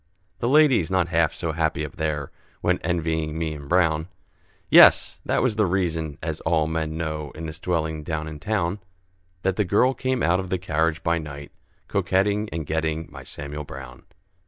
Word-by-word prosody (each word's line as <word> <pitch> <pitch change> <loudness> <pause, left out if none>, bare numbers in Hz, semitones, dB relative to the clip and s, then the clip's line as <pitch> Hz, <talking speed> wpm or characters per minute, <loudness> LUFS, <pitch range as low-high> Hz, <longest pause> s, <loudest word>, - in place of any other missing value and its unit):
The 120 - 0
ladies, 135 - +5
not 95 -2 +1
half 85 -2 +2
so 85 -2 -3
happy 80 -1 0
up 75 - -10
there, 75 -3 -2 0.3
Went - - +2
envying 80 -2 -1
me 80 -1 -2
and 70 -2 -9
Brown; 80 -3 +2 0.6
Yes! - - +7
that - - +1
was 120 -5 +1
the 105 -3 +3
reason 80 -5 -1
(as 80 -1 -3
all 80 -1 +2
men 80 0 -2
know, 75 -2 -3
In 80 - -6
this 80 +1 -7
dwelling 80 -3 -1
down 80 0 -3
in 75 -1 -7
town), 100 -1 -1 0.6
That 95 -1 0
the 105 - +3
girl 105 +8 +3
came 130 -2 -1
out 85 +2 +3
of 95 -1 -5
the 95 - 0
carriage 80 -2 0
by 85 0 +1
night, 70 -2 -8 0.4
Coquetting 105 +3 +1
and 80 -2 -4
getting 80 +1 -2
my - - -9
Samuel 75 +1 -6
Brown. 65 -3 -10
80 Hz, 180 wpm, -24 LUFS, 75-95 Hz, 0.6 s, Yes